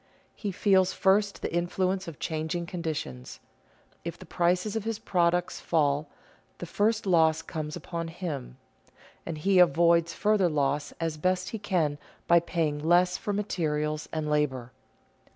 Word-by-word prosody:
He 205 - -4
feels 190 -1 +3
first 200 +1 +2
the - - -3
influence 185 +2 0
of 160 -4 -7
changing 160 +2 -3
conditions. 155 - -5 0.6
If 170 0 -5
the - - -12
prices 180 +4 0
of 220 - -1
his 225 -1 -2
products 175 -4 0
fall, 145 -2 +1 0.5
the - - -6
first 215 +5 0
loss 160 -3 +3
comes 155 -1 -5
upon 170 -1 -5
him, 155 -7 -6 0.7
and 165 - -4
he 190 +4 +3
avoids 170 0 +4
further 210 -4 +2
loss 145 -1 0
as 165 -2 -3
best 185 +3 0
he 225 - -5
can 170 -8 0 0.3
by 170 0 +6
paying 160 -3 -1
less 175 +3 +3
for 205 - -3
materials 155 -7 -2
and 155 -1 -2
labor. 135 -5 0
170 Hz, 145 wpm, -28 LUFS, 155-185 Hz, 0.7 s, by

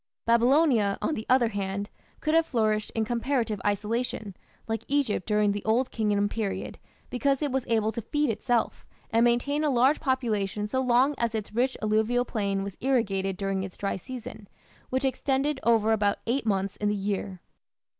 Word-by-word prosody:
Babylonia, 235 -3 +3
on - - -1
the 220 -5 -5
other 250 -2 +4
hand, 200 -1 -3 0.3
could 310 - 0
have 330 0 +4
flourished 215 -3 0
in 220 -1 +1
comparative 235 -2 -1
isolation, 210 0 -2 0.3
like 225 -1 -2
Egypt 275 -9 0
during 210 -1 +3
the 205 0 -4
Old 240 +4 +1
Kingdom 205 -2 +1
period, 210 -2 -4 0.3
because 275 +3 +1
it 290 - 0
was 265 -1 -1
able 220 -1 +1
to 235 - -4
feed 295 +4 0
itself 225 +2 -1 0.3
and 230 0 +4
maintain 245 +5 +2
a 300 - +2
large 265 +3 +3
population 215 -7 -1
so 260 +5 0
long 255 +3 +3
as 235 -1 0
its 215 -1 -4
rich 255 +3 +1
alluvial 220 +3 +2
plain 200 -4 -1
was 200 -1 -7
irrigated 195 -8 0
during 195 -1 -1
its 190 -1 -7
dry 200 - -2
season, 225 -1 -8 0.4
which 260 +1 0
extended 270 +2 0
over 225 -2 +3
about 205 -2 +2
eight 235 +1 -1
months 195 -1 0
in 210 - 0
the 210 - 0
year. 195 -1 -3
225 Hz, 175 wpm, -27 LUFS, 205-255 Hz, 0.4 s, other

